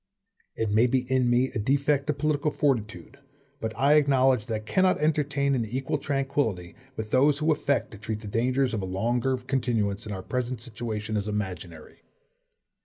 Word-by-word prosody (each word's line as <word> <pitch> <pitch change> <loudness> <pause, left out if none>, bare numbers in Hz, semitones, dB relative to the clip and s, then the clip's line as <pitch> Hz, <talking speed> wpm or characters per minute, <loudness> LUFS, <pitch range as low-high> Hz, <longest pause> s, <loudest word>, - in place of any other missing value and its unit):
It 110 -2 -1
may 110 +4 +4
be 130 +1 +1
in 130 -2 +3
me 125 +2 +2
a 120 - -2
defect 140 +4 +1
of 145 - 0
political 150 0 +1
fortitude, 135 -3 -2 0.4
but 110 - -3
I 140 +4 +4
acknowledge 135 -5 +3
that 115 - -2
I - - 0
cannot 185 - +2
entertain 145 -2 +1
an 125 -3 +1
equal 130 +6 -2
tranquillity 135 -11 -1 0.2
with 110 -1 -5
those 140 +2 +4
who 155 +2 +1
affect 140 -2 0
to 105 - -11
treat 110 -1 -4
the 105 - -8
dangers 125 +4 +1
of 105 - -1
a - - -3
longer 120 +7 0
continuance 120 -6 -1
in - - -5
our 95 -2 -5
present 125 +2 -3
situation 110 -2 -4
as 100 0 -2
imaginary. 90 -6 -5
125 Hz, 180 wpm, -26 LUFS, 110-140 Hz, 0.4 s, may